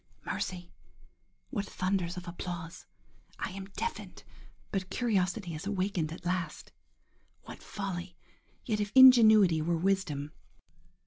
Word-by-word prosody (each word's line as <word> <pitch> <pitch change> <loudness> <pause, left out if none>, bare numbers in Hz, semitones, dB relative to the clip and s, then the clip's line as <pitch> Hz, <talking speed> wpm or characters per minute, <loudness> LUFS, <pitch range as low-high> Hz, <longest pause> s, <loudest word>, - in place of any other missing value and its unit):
–Mercy! 180 -2 -4 0.8
what 205 -7 -3
thunders 185 -2 -2
of 180 0 -7
applause!–I 175 0 -8
am 190 +1 -7
deafened, 460 - -5 0.5
but 190 -2 -2
curiosity 195 -5 -1
is 155 +5 -6
awakened 185 -5 -1
at 165 - -9
last.–What 180 0 -7
folly!–Yet 195 +3 -6
if 205 0 -2
ingenuity 220 -10 +8
were 170 +2 0
wisdom. 160 -6 -1
185 Hz, 100 wpm, -30 LUFS, 175-205 Hz, 0.8 s, ingenuity